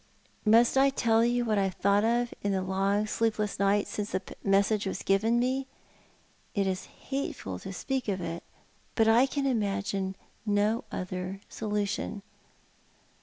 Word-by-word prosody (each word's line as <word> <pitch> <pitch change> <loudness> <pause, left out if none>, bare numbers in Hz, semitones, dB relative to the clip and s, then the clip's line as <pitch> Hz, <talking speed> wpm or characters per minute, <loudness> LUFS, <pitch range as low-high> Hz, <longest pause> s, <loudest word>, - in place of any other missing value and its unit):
Must 235 +4 +5
I 275 +1 +6
tell 230 -4 +2
you 240 0 +1
what 215 -3 +2
I 195 - +2
have 190 - -3
thought 200 +1 +3
of 235 +1 +1
in 200 -1 0
the 190 -1 0
long 195 +2 +1
sleepless 215 -2 -1
nights 200 +1 +2
since 210 0 -4
that 185 - -4
message 200 +1 +2
was 190 - -4
given 215 +4 +2
me? 260 +2 0 0.9
It 200 -1 +2
is 190 -1 -2
hateful 270 - -5
to 195 - -7
speak 260 +7 -3
of 195 -2 -1
it, 170 -1 -4 0.5
but 225 -1 +4
I 235 +4 +5
can 280 0 -2
imagine 200 -5 -1 0.3
no 210 +2 +1
other 185 +1 -4
solution. 205 -1 -2
205 Hz, 155 wpm, -29 LUFS, 195-230 Hz, 0.9 s, I